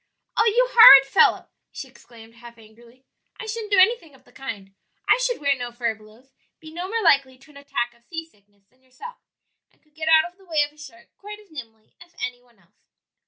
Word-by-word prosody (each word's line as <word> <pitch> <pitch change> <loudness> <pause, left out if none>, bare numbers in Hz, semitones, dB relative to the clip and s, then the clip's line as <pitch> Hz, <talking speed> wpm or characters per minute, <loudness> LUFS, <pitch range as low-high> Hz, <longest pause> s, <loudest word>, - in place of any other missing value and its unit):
"Oh, 445 - +2
you 485 +3 +2
horrid 275 - +9
fellow!" 270 - +2 0.2
she - - -9
exclaimed, 230 -1 -18
half 235 0 -16
angrily; 230 +3 -21 0.3
"I 470 - -7
shouldn't 440 -1 -7
do 400 - +2
anything 370 - +2
of - - -24
the - - -25
kind; 205 -7 -9 0.3
I - - +3
should - - -2
wear 280 -1 0
no 245 -2 -7
furbelows, 235 +1 -8 0.3
be 315 0 -14
no 350 +2 -6
more 455 +1 -3
likely 265 -2 +2
to 275 +4 -21
an 280 - -17
attack 240 -4 -4
of 235 0 -30
sea 325 +2 -8
sickness 205 -8 -34
than 255 +6 -38
yourself, 260 - -13 0.5
and - - -36
could 305 -1 -38
get 315 0 -7
out 320 0 +5
of 360 - -36
the 385 - -21
way 315 -4 0
of 295 - -16
a - - -29
shark 235 -6 -15
quite 415 +1 -10
as 420 -4 -22
nimbly 225 -7 -13
as 345 0 -19
any 245 -1 -6
one 240 -2 -30
else." 190 +2 -35
270 Hz, 220 wpm, -22 LUFS, 235-345 Hz, 0.5 s, horrid